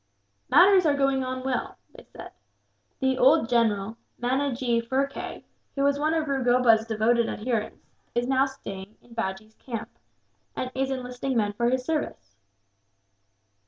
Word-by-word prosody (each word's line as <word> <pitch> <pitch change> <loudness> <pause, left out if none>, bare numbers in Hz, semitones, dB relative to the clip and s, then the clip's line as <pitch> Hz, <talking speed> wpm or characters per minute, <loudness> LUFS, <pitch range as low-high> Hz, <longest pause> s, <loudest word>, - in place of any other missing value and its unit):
"Matters 370 -1 +6
are 290 - +3
going 275 -1 +2
on 255 0 -4
well," 265 -1 -2 0.2
they - - -12
said. - - -11 0.7
"The 265 -1 +1
old 270 0 +5
general, 225 -3 +1 0.2
Manajee 250 -2 0
Phurkay, 270 +4 -3 0.3
who 275 - 0
was 280 0 +2
one 310 +2 +1
of 315 -1 -1
Rugoba's 245 -4 +3
devoted 230 +1 +2
adherents, 220 -1 -3 0.3
is 240 0 +1
now 265 +1 +2
staying 200 -6 -9
in 240 - -17
Bajee's 215 -1 -4
camp, 230 -4 -6 0.7
and 255 - -3
is 265 0 -1
enlisting 255 0 -3
men 205 -2 +1
for 235 +3 +1
his 255 0 -1
service." 295 - -3
250 Hz, 140 wpm, -26 LUFS, 230-270 Hz, 0.7 s, Matters